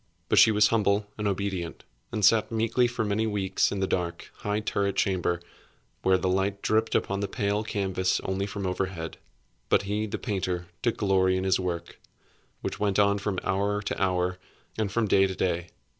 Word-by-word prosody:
But - - +5
she - - +8
was 105 -1 +4
humble 105 -2 +2
and 105 -1 -2
obedient, 95 -3 -3 0.3
and 105 -3 +1
sat 110 +1 +4
meekly 115 +2 +2
for 120 -2 -2
many 105 +2 0
weeks 100 -3 +1
in 100 - -2
the - - +3
dark, 90 -2 -3
high 105 +1 -1
turret 100 -2 -1
chamber 90 -3 +1 0.6
where 95 0 +4
the 95 - -1
light 95 +2 0
dripped 110 +1 +1
upon 100 0 0
the 100 - -1
pale 100 +1 -1
canvas 95 -4 0
only 95 +1 -2
from 100 -1 -5
overhead. 90 -3 -3 0.5
But - - +4
he, 105 +2 -1
the - - -3
painter, 95 -5 -2 0.2
took 120 -2 0
glory 95 -2 +3
in 95 - -1
his 95 -1 +2
work, 85 -2 -4 0.6
which - - -4
went 100 -2 +1
on 100 0 +4
from 100 -1 -2
hour 100 +2 0
to - - -3
hour, 90 -1 +1 0.4
and 110 -3 -1
from 110 +1 +1
day 95 0 +4
to 95 - -5
day. 90 -2 -1
100 Hz, 190 wpm, -27 LUFS, 95-105 Hz, 0.6 s, she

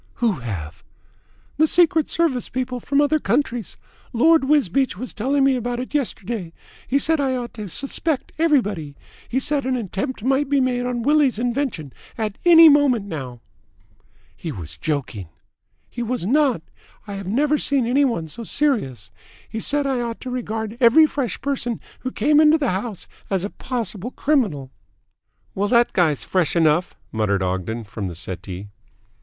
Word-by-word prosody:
"Who 235 -3 +2
have?" 85 -9 -6 0.7
"The 315 +1 +4
Secret 325 -2 +3
Service 310 -8 0
people 255 0 -3
from 280 +4 +1
other 305 +1 +2
countries. 240 - -1 0.4
Lord 315 +4 +4
Wisbeach 270 - +2
was 255 +4 -6
telling 270 +5 +1
me 270 -1 +4
about 245 0 -3
it 255 - -6
yesterday. 220 - -3 0.3
He 275 - +2
said 320 +3 +2
that - - +1
I 260 - 0
ought 240 -2 -5
to 210 -3 -7
suspect 280 - -2
everybody. 205 - +1 0.3
He 250 - -1
said 285 +2 +1
that 260 - -3
an 260 - +1
attempt 225 +2 -4
might 270 +2 +1
be 285 -1 +3
made 250 -1 0
on 240 -2 -2
Willie's 290 -3 +3
invention 240 - -2 0.2
at 215 -3 -3
any 330 -1 +9
moment 285 -8 +4
now." 130 -10 -7 0.9
"He 165 - -6
was 85 - -8
joking." 135 - -3 0.6
"He 240 - -7
was 235 -4 -2
not. 260 - +2 0.4
I 205 - -7
have 195 -2 -6
never 290 +8 +1
seen 275 -4 +2
any 260 +5 +3
one 200 - 0
so 195 +10 -7
serious. 225 - -1 0.4
He 220 - -5
said 290 +5 +1
that 275 -1 0
I - - -1
ought 235 -1 -4
to 255 - -6
regard 225 -2 -4
every 260 +6 +7
fresh 280 -5 -3
person 255 -4 -2 0.2
who 255 - -4
came 300 +3 +3
into 310 +1 +6
the 280 -5 0
house 200 +1 -4 0.2
as 190 -2 0
a 200 - -4
possible 235 -4 -4
criminal." 215 - 0 0.8
"Well, 200 +1 -1
that 240 -1 +3
guy's 160 -6 +2
fresh 180 -4 0
enough," 165 +1 +2 0.2
muttered 100 -3 0
Ogden 95 +5 -2
from 105 -2 -6
the 85 - -6
settee. 95 +1 -6
Mrs. - - -12
240 Hz, 170 wpm, -22 LUFS, 180-275 Hz, 0.9 s, any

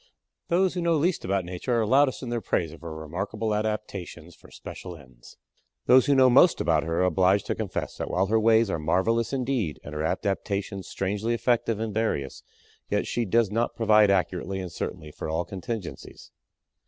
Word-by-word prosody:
Those 185 +2 +2
who 180 - -2
know 170 -1 +2
least 170 +4 0
about 95 -1 -1
Nature 90 +7 -2
are 110 - +1
loudest 135 +4 +3
in 125 - -5
their 120 -1 -2
praise 85 -6 -1
of 80 - -13
her 85 -1 -7
remarkable 100 +8 -3
adaptations 105 -6 -4
for - - -18
special 90 -2 -9
ends. 65 -5 -17 0.5
Those 130 0 +6
who 140 - +4
know 130 -1 +6
most 135 +8 +5
about 80 -1 +2
her 80 +1 -1
are - - +3
obliged 95 +3 +2
to - - -1
confess - - -4
that - - -4
while 95 +2 +1
her 110 +3 +2
ways 110 -1 +4
are 80 - -2
marvelous 115 +9 +1
indeed 125 - -1
and 75 - -9
her 75 - -3
adaptations 100 +1 -2
strangely 105 +4 -2
effective 115 -2 0
and 110 -1 -3
various 105 -11 -2 0.5
yet - - 0
she 120 - -1
does 110 +1 +2
not 115 +2 -1
provide 110 -2 +4
accurately 95 0 0
and 90 -2 -6
certainly 75 -2 -6
for 80 - -6
all 80 +2 -1
contingencies. 95 +1 -7
100 Hz, 190 wpm, -26 LUFS, 90-115 Hz, 0.5 s, Those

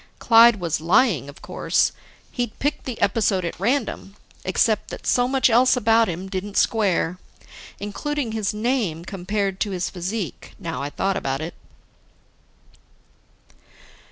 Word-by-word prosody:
Clyde 230 0 +7
was 170 -3 -2
lying, 175 - +3
of 140 - -14
course. - - +1 0.4
He'd 245 -3 -3
picked 290 +2 -2
the 250 -4 -5
episode 195 -3 +1
at 170 - -5
random. 225 -3 -1 0.3
Except 215 +3 +1
that - - -8
so 245 0 +3
much 265 0 +3
else 250 +2 +4
about 225 -1 +3
him 180 +3 -5
didn't 195 +1 -4
square. 185 -5 +1 0.6
Including 255 +5 -3
his 215 -2 -1
name 210 -7 -1
compared 195 0 -2
to 210 - 0
his 185 -2 -3
physique, 185 +2 -5
now 165 -4 -5
I 140 - -3
thought 195 +6 -1
about 135 0 -2
it. 160 +3 -5
205 Hz, 135 wpm, -23 LUFS, 180-230 Hz, 0.6 s, Clyde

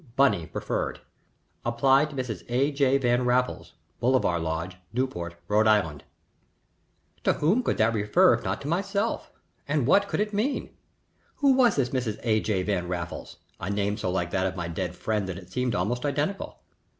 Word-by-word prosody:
BUNNY 100 - +3
preferred. - - -3 0.6
Apply 135 +4 +4
to 150 -2 -9
Mrs. 125 -8 -4
A. 135 +4 +2
J. 140 -1 +3
Van 125 -1 +2
Raffles, 125 +1 0 0.3
Bolivar 120 -8 +2
Lodge, 80 +3 -3
Newport, 95 -9 -2
R.I." 105 -8 +3 1.2
To - - +3
whom 185 +12 +2
could - - -1
that 110 +1 +3
refer 105 -1 +4
if - - -2
not - - -2
to 140 - -6
myself, 200 +6 -1 0.4
and 145 -3 +1
what 200 +9 +4
could - - -2
it 210 0 -1
mean? 235 +8 -1 0.6
Who 280 -2 +4
was 250 -5 +4
this 130 -3 +1
Mrs. 120 -5 -2
A. 110 -2 +3
J. 100 -4 0
Van 90 -3 -1
Raffles? 85 -1 -5 0.2
a 90 - -4
name 100 0 0
so 105 -4 -3
like 85 -1 -1
that 95 -1 +1
of 95 - -4
my 85 -2 -3
dead 85 +1 -3
friend 105 -3 -2
that 90 - -4
it 90 -1 -12
seemed 125 +1 -1
almost 120 +8 -1
identical. 150 +7 -2
120 Hz, 175 wpm, -26 LUFS, 95-140 Hz, 1.2 s, Apply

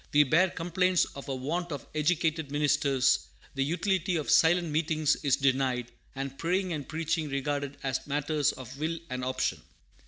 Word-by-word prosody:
We 150 0 +7
bear 165 +7 +3
complaints 180 +1 +1
of 140 0 -9
a 135 - -1
want 165 +7 -3
of 140 -4 -5
educated 160 -1 0
ministers; 145 -2 +2 0.3
the 135 - 0
utility 180 +4 0
of 155 -3 -1
silent 170 +1 +4
meetings 155 -1 +1
is 140 -3 +2
denied, 130 -3 0 0.2
and 135 0 -5
praying 180 +2 0
and 145 -4 -5
preaching 160 0 -1
regarded 140 0 -2
as 135 0 -2
matters 145 +1 +1
of 130 +1 -10
will 160 +2 -1
and 130 0 -3
option. 130 0 -1
150 Hz, 160 wpm, -29 LUFS, 135-165 Hz, 0.3 s, We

